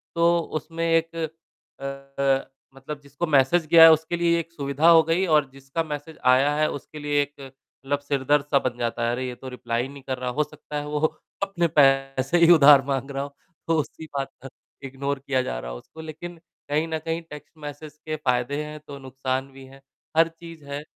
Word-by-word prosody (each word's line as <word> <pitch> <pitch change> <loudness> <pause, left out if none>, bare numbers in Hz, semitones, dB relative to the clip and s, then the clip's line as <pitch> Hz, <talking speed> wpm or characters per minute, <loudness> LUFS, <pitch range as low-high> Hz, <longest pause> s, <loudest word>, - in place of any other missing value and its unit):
तो 170 0 +4
उसमें 165 +1 -4
एक 165 0 +1 0.6
अ, 135 0 -2 0.3
मतलब 140 +2 -7
जिसको 140 +4 -4
मैसेज 155 +4 +3
गया 165 -1 +10
है 165 - +11
उसके 160 +2 +1
लिए 170 0 +2
एक 165 0 -6
सुविधा 145 +1 +2
हो 165 -1 +8
गई 165 +4 +1
और 150 -5 +3
जिसका 135 +4 -4
मैसेज 150 +1 -7
आया 130 +3 +5
है 155 0 +2
उसके 150 +2 -8
लिए 145 0 +1
एक 145 +1 -5 0.5
मतलब 145 +1 0
सिरदर्द-सा 145 0 +1
बन 125 -2 -3
जाता 120 0 -2
है। - - +1
अरे, 130 +1 -2
ये 125 - -5
तो 130 +1 -9
रिप्लाई 120 -2 -2
ही 130 - -3
नहीं 140 -1 -12
कर 130 -1 -3
रहा, 125 0 -3
हो 150 +4 +1
सकता 150 0 -8
है 145 - -5
वो 150 0 -2 0.4
अपने 175 -4 0
पैसे 135 +2 +3
ही 170 0 +6
उधार 145 -3 +8
माँग 135 0 -2
रहा 135 0 -2
हो। 140 0 -9 0.3
तो 165 -1 +2
उसी 160 +2 -5
बात 135 - -3
पर 135 - -8 0.4
इग्नोर 140 +1 -3
किया 130 -1 0
जा - - -4
रहा - - -7
हो - - -6
उसको 160 - -13
लेक़िन 165 +2 -8 0.3
कहीं 155 +3 +1
न 160 -1 -2
कहीं 165 +1 -2
टेक्स्ट 150 +2 -12
मैसेज 150 +1 -9
के 155 0 -2
फ़ायदे 140 +1 -1
हैं 150 0 -8
तो 140 -1 -8
नुकसान 130 0 -3
भी 135 0 -13
है, 135 +1 -16 0.4
हर 165 0 +6
चीज़ 165 -3 -11
है। 140 +1 -5
145 Hz, 210 wpm, -24 LUFS, 135-160 Hz, 0.6 s, है